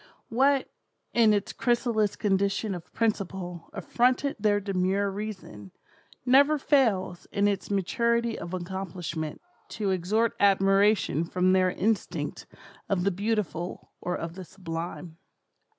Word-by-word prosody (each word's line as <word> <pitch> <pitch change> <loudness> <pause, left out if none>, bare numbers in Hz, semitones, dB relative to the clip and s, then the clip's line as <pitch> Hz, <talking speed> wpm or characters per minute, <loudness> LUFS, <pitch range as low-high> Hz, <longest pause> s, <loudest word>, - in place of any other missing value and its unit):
What, 270 +3 +3 0.5
in 230 -2 +5
its 205 -1 0
chrysalis 235 -4 +1
condition 200 +1 0
of 175 -1 -8
principle, 190 -6 -2
affronted 255 +3 +1
their 205 -1 +2
demure 195 0 0
reason, 190 - -7 0.5
never 280 +4 +5
fails, 230 - +1
in 205 0 +2
its 200 -2 -1
maturity 235 +4 +1
of 170 - -7
accomplishment, 175 -4 -5 0.3
to 205 -3 -2
extort 210 +6 +1
admiration 195 -3 +3
from 180 +2 +1
their 185 -1 +4
instinct 210 +4 -2 0.4
of 190 -3 +1
the 200 - +2
beautiful 195 -3 -3
or 180 - -2
of 165 0 -5
the 185 +1 -8
sublime. 170 -2 -7
195 Hz, 120 wpm, -27 LUFS, 180-220 Hz, 0.5 s, in